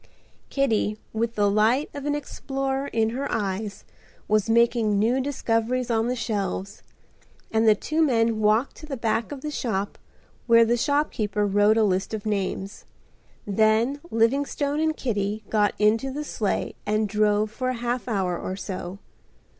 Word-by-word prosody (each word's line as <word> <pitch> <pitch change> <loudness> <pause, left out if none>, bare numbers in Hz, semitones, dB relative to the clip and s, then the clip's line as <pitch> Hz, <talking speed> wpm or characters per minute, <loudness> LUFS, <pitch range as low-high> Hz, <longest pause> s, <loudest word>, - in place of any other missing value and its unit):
Kitty, 225 -6 +1 0.2
with 230 +1 -1
the 205 -1 +3
light 220 +8 +3
of 285 0 -5
an 290 - +1
explorer 270 -1 -3
in 225 -2 0
her 270 +4 -3
eyes, 205 -1 -3 0.4
was 215 0 +2
making 230 -2 +3
new 235 +6 +2
discoveries 245 -2 -1
on 225 0 +1
the 250 - 0
shelves, 200 -4 -3 0.7
and 220 0 +2
the 215 - +7
two 310 +7 -1
men 230 -6 +2
walked 215 +5 +2
to 310 - -11
the 275 -3 -4
back 225 +1 -1
of 280 -2 -6
the 300 - -4
shop 205 -8 -3 0.5
where 230 -1 +6
the 235 +1 +2
shopkeeper 235 -7 0
wrote 205 +2 +3
a 225 - +4
list 195 +1 0
of 215 - -7
names. 195 -1 -3 0.6
Then 220 +6 +2
Livingstone 280 +5 +1
and 315 0 0
Kitty 210 -3 -2
got 210 -2 +2
into 220 +5 +2
the 290 +3 -4
sleigh 220 -8 -2
and 215 +1 0
drove 210 0 +1
for 255 +3 -2
a 255 - -1
half 240 +1 -3
hour 190 -6 0
or 185 - -4
so. 190 -1 -6
225 Hz, 160 wpm, -25 LUFS, 210-255 Hz, 0.7 s, the